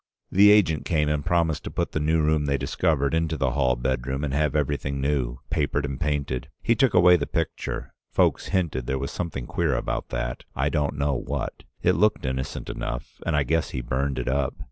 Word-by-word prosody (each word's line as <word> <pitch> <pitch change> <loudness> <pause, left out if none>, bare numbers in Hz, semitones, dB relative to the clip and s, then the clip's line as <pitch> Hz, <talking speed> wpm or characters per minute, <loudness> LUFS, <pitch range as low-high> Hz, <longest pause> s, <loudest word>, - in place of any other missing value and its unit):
The 100 +2 +7
agent 90 -8 +4
came 75 -3 +1
and 75 -1 0
promised 85 -2 +1
to - - -3
put - - -2
the - - -1
new 80 +1 +2
room 75 -1 +2
they 70 0 +2
discovered 70 +1 0
into 80 -1 0
the 65 -2 +1
hall 65 -2 +2
bedroom 65 +2 -2
and 70 -2 -2
have 75 0 +1
everything 70 -2 -1
new 65 -3 0
— - - -40
papered 75 -1 0
and 70 -2 -4
painted. 70 -4 -1
He 115 - +4
took 120 -1 +2
away 90 0 +7
the 70 - -3
picture; 80 0 -3 0.2
folks - - +2
hinted 80 -10 -1
there 65 - 0
was 70 +1 -3
something 80 -8 -4
queer 85 -5 0
about - - -2
that, - - -3
I 70 +2 +1
don't 75 -1 0
know 70 0 +1
what. 65 - -4 0.2
It - - +5
looked 105 +4 +2
innocent 65 +1 -3
enough, - - -5
and 85 - +1
I 75 - +3
guess 80 +5 0
he 65 - -4
burned 65 +3 -1
it - - -3
up. 65 0 0
75 Hz, 210 wpm, -25 LUFS, 65-80 Hz, 0.2 s, The